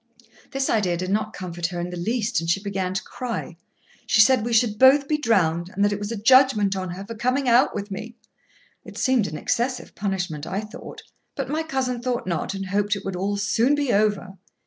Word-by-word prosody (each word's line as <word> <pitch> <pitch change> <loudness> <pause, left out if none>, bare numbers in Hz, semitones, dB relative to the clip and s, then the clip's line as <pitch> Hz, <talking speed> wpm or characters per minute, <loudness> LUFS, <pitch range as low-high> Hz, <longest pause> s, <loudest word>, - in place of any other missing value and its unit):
This 270 0 -1
idea 185 -6 +1
did 185 +2 -3
not 215 +1 0
comfort 175 -4 -4
her 175 0 -5
in 175 +1 -4
the - - -5
least, 220 +4 -1
and 165 - -4
she 175 - +2
began 190 -2 -3
to 195 - -2
cry. 235 -8 -5 0.5
She - - +3
said 230 +1 +6
we 235 - -3
should 220 -2 +2
both 275 +2 +6
be 300 0 0
drowned, 175 - +1
and 200 +2 0
that 205 - +1
it 205 - -4
was 205 +1 -4
a - - -2
judgment 220 -3 +4
on 185 -1 -4
her 185 +3 -7
for 230 - -7
coming 255 +4 0
out 245 +2 +4
with 205 0 -5
me. 225 +4 -7 0.7
It - - -11
seemed 255 -6 +2
an 155 - -6
excessive 250 - -2
punishment, 180 -7 -3
I 195 - -2
thought; 215 0 -10 0.3
but 275 -1 -4
my 310 +1 0
cousin 265 -6 -2
thought 250 -1 -2
not, 175 +2 -2
and 195 0 -4
hoped 205 +2 0
it 200 - -8
would 195 -1 -3
all 200 +3 -1
soon 225 +7 +2
be 285 -4 0
over. 200 -2 0
210 Hz, 220 wpm, -23 LUFS, 190-245 Hz, 0.7 s, said